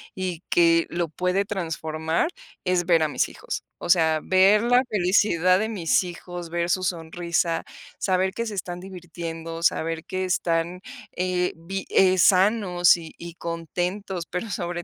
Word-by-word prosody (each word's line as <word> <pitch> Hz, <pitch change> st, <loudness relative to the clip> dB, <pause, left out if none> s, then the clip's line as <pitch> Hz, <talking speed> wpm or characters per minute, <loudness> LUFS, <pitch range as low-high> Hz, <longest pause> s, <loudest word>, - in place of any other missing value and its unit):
y 185 Hz, -2 st, -4 dB
que 165 Hz, -1 st, +4 dB
lo 170 Hz, -1 st, -2 dB
puede 180 Hz, +5 st, 0 dB
transformar, 160 Hz, -, -2 dB, 0.3 s
es 180 Hz, -2 st, +1 dB
ver 165 Hz, -2 st, +4 dB
a 155 Hz, -, +1 dB
mis -, -, 0 dB
hijos. -, -, -6 dB, 0.2 s
O -, -, -5 dB
sea, 160 Hz, -3 st, +4 dB
ver 195 Hz, +3 st, +5 dB
la 245 Hz, +1 st, +4 dB
felicidad 185 Hz, -2 st, +3 dB
de 215 Hz, -, 0 dB
mis 215 Hz, +1 st, +1 dB
hijos, 175 Hz, -1 st, -7 dB
ver 170 Hz, 0 st, -1 dB
su 185 Hz, +1 st, +1 dB
sonrisa, 170 Hz, -1 st, -1 dB, 0.4 s
saber 190 Hz, 0 st, +1 dB
que 230 Hz, -, -3 dB
se 215 Hz, -2 st, -5 dB
están 175 Hz, -2 st, -4 dB
divirtiendo, 165 Hz, -3 st, -7 dB
saber 165 Hz, -1 st, 0 dB
que 185 Hz, 0 st, -3 dB
están, 175 Hz, -1 st, 0 dB, 0.4 s
eh, 180 Hz, 0 st, 0 dB
bi 190 Hz, +4 st, -5 dB
eh, 185 Hz, -1 st, +4 dB
sanos 185 Hz, -1 st, +4 dB
y 165 Hz, -2 st, -9 dB
y 170 Hz, 0 st, -8 dB
contentos, 175 Hz, +3 st, -4 dB
pero 180 Hz, +6 st, -5 dB
sobre 175 Hz, -1 st, -3 dB
175 Hz, 155 wpm, -24 LUFS, 165-185 Hz, 0.4 s, ver